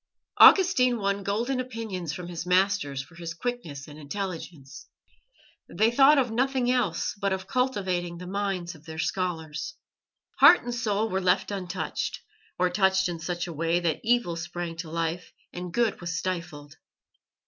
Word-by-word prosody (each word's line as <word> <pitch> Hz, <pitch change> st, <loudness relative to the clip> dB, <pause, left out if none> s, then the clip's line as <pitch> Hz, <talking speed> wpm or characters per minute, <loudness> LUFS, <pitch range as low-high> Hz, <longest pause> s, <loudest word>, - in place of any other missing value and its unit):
Augustine 255 Hz, -11 st, +7 dB
won 200 Hz, -1 st, -1 dB
golden 230 Hz, +7 st, -1 dB
opinions 225 Hz, -, -4 dB
from 175 Hz, +3 st, -6 dB
his 170 Hz, -2 st, -5 dB
masters 180 Hz, -7 st, +1 dB
for 130 Hz, -, -20 dB
his 165 Hz, -1 st, -7 dB
quickness 165 Hz, -, -5 dB
and 150 Hz, 0 st, -11 dB
intelligence. 165 Hz, -3 st, -6 dB, 0.8 s
They 220 Hz, +1 st, +2 dB
thought 275 Hz, +4 st, +6 dB
of 250 Hz, -4 st, +2 dB
nothing 255 Hz, +1 st, +1 dB
else 245 Hz, -10 st, 0 dB
but 200 Hz, -1 st, -2 dB
of 190 Hz, 0 st, -2 dB
cultivating 190 Hz, -8 st, -1 dB
the 180 Hz, -, -8 dB
minds 190 Hz, -2 st, -3 dB
of 160 Hz, -1 st, -17 dB
their 160 Hz, -1 st, -8 dB
scholars. 165 Hz, -, -3 dB, 0.6 s
Heart 355 Hz, -, +8 dB
and 245 Hz, 0 st, -4 dB
soul 220 Hz, -2 st, 0 dB
were 190 Hz, -2 st, -1 dB
left 180 Hz, +2 st, +1 dB
untouched, 185 Hz, -3 st, -3 dB, 0.4 s
or 180 Hz, 0 st, +2 dB
touched 190 Hz, 0 st, +2 dB
in 170 Hz, -1 st, -5 dB
such 175 Hz, +1 st, -3 dB
a 175 Hz, -, -6 dB
way 165 Hz, +2 st, +1 dB
that 165 Hz, -3 st, -1 dB
evil 235 Hz, -7 st, +2 dB
sprang 170 Hz, 0 st, -5 dB
to 165 Hz, -1 st, -6 dB
life 165 Hz, +2 st, -3 dB, 0.2 s
and 180 Hz, 0 st, -6 dB
good 225 Hz, 0 st, 0 dB
was 170 Hz, -1 st, -3 dB
stifled. 170 Hz, -6 st, -5 dB
185 Hz, 160 wpm, -27 LUFS, 170-220 Hz, 0.8 s, Heart